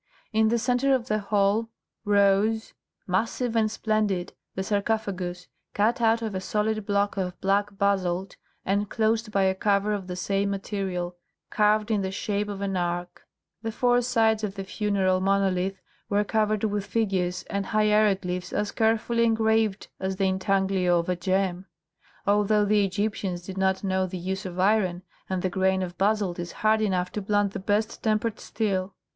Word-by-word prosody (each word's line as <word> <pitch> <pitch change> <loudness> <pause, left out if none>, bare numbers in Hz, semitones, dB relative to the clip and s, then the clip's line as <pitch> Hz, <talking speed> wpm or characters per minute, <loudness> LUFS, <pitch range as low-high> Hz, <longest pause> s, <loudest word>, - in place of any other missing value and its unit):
In 220 0 +4
the 235 +2 +2
centre 250 +3 +2
of 250 -1 -4
the 215 0 +1
hall 205 +2 +1 0.4
rose, 205 +2 +2 0.3
massive 225 +5 -1
and 220 -1 +3
splendid, 215 -5 -1 0.2
the 190 - -2
sarcophagus, 200 -4 -2 0.3
cut 225 +4 +2
out 230 0 +3
of 220 -2 -3
a 190 - -3
solid 215 +1 -1
block 200 0 +1
of 180 -2 -3
black 200 +1 0
basalt 190 -2 0 0.3
and 200 +1 0
closed 220 0 0
by 195 -2 +2
a 190 0 +3
cover 200 +1 +1
of 195 -3 -4
the 180 - -4
same 195 +2 0
material, 190 -3 -3 0.3
carved 215 +1 +2
in 210 -2 +2
the 190 - -2
shape 205 +1 -2
of 200 -1 -5
an 195 -1 -1
arch. 175 0 -1 0.5
The 225 0 -3
four 245 +2 +2
sides 225 -3 +2
of 200 -2 -3
the 195 - -4
funeral 190 -2 0
monolith 195 -1 +1 0.3
were 205 +1 +2
covered 215 0 0
with 205 -2 0
figures 190 -5 -1
and 200 -1 -3
hieroglyphs 210 -4 +1
as 205 -1 -1
carefully 225 +1 +1
engraved 220 -2 +1
as 190 0 -2
the 195 0 0
intaglio 190 -1 +2
of 170 +1 -1
a 180 - +1
gem, 185 +1 -1 0.6
although 210 +1 +3
the 205 0 +3
Egyptians 195 -2 -2
did 185 +1 -7
not 190 0 +1
know 190 -1 0
the 185 0 -5
use 190 +3 -3
of 180 0 -7
iron, 185 -3 +2 0.3
and 185 -1 -2
the 185 - +1
grain 190 0 +1
of 175 -1 -6
basalt 200 -3 +1
is 175 -1 -4
hard 220 0 +4
enough 185 -4 0
to 210 - -3
blunt 205 0 +1
the - - -4
best 210 +3 -1
tempered 220 0 0
steel. 190 -3 -2
200 Hz, 170 wpm, -26 LUFS, 190-215 Hz, 0.6 s, In